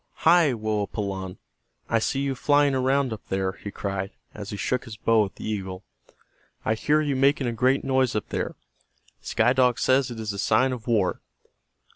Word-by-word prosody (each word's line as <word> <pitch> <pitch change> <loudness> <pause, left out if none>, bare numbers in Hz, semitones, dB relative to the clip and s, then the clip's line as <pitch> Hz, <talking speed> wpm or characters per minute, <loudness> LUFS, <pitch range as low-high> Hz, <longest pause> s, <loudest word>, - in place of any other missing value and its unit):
"Hi, 165 -3 +6
Woapalanne, 100 -3 -3 0.5
I 115 - +2
see 135 +4 -1
you 140 -1 0
flying 145 +1 +3
around 130 -1 +1
up 110 - -8
there," 95 0 -1
he 100 - -9
cried, 100 -1 -4 0.2
as 105 -1 -8
he 105 - -5
shook 125 +6 -1
his 110 -3 -9
bow 110 -1 +3
at 95 - -10
the - - -7
eagle. 95 -3 -4 0.8
"I 110 - +2
hear 150 +7 +2
you 145 -3 -1
making 135 +1 +3
a 120 - 0
great 130 +4 +2
noise 130 -3 +1
up 105 - -2
there. - - -3 0.7
Sky 120 +3 +2
Dog 125 -2 +3
says 130 0 +2
it 120 -2 -7
is 110 -2 -3
a 100 - -6
sign 130 +6 +3
of 120 -2 -8
war. 105 -6 +1
115 Hz, 185 wpm, -25 LUFS, 105-135 Hz, 0.8 s, Hi